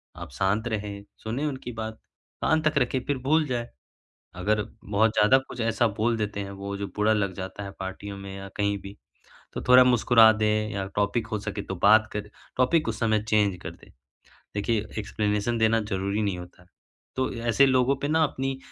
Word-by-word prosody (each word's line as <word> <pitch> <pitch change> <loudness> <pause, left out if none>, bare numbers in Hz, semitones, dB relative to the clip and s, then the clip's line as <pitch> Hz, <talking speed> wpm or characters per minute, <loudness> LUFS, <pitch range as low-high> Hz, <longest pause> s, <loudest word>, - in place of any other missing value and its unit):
आप - - -9
शांत 100 - 0
रहें, 105 -2 -4 0.2
सुनें 120 +7 -2
उनकी 130 -4 -4
बात, 110 -1 -5 0.5
कान 160 0 +2
तक 155 -2 +1
रखें 130 0 0
फिर 145 - -1
भूल 155 +3 +3
जाएँ, 120 -2 -2 0.7
अगर 105 +3 +1 0.2
बहुत 105 +2 +2
ज़्यादा 105 +6 +6
कुछ - - -8
ऐसा 115 +1 +2
बोल 115 +1 +2
देते 105 -2 -3
हैं 100 -1 -5
वो 100 0 -4
जो 100 0 -4
बुरा 105 +1 +3
लग 100 -3 0
जाता 95 +2 -6
है 100 - -6
पार्टियों 95 +1 -6
में 100 0 -8
या 95 0 -8
कहीं 100 0 0
भी 100 +1 -10 0.6
तो - - -5
थोड़ा 125 0 +9
मुस्कुरा 115 -2 +6
दें 105 0 0
या 100 -2 -3
टॉपिक 105 +3 0
हो 110 -2 -2
सके 100 0 -4
तो 95 - -5
बात 110 +2 +6
कर 105 0 -4 0.3
टॉपिक 130 +3 +2
उस 110 - -3
समय 110 -2 +2
चेंज 105 -3 +2
कर - - -5
दें। - - -17 0.7
देखिए 105 +1 0
एक्सप्लेनेशन 105 +2 -1
देना 110 0 +3
ज़रूरी 100 0 -2
नहीं 100 -3 -1
होता 90 0 -12
है, 90 - -24 0.5
तो 130 0 +1
अ, - - -7
ऐसे 140 +4 +5
लोगों 130 +1 +3
पे 145 - 0
ना 160 +1 +3
अपनी 135 -2 -2
110 Hz, 200 wpm, -26 LUFS, 100-120 Hz, 0.7 s, थोड़ा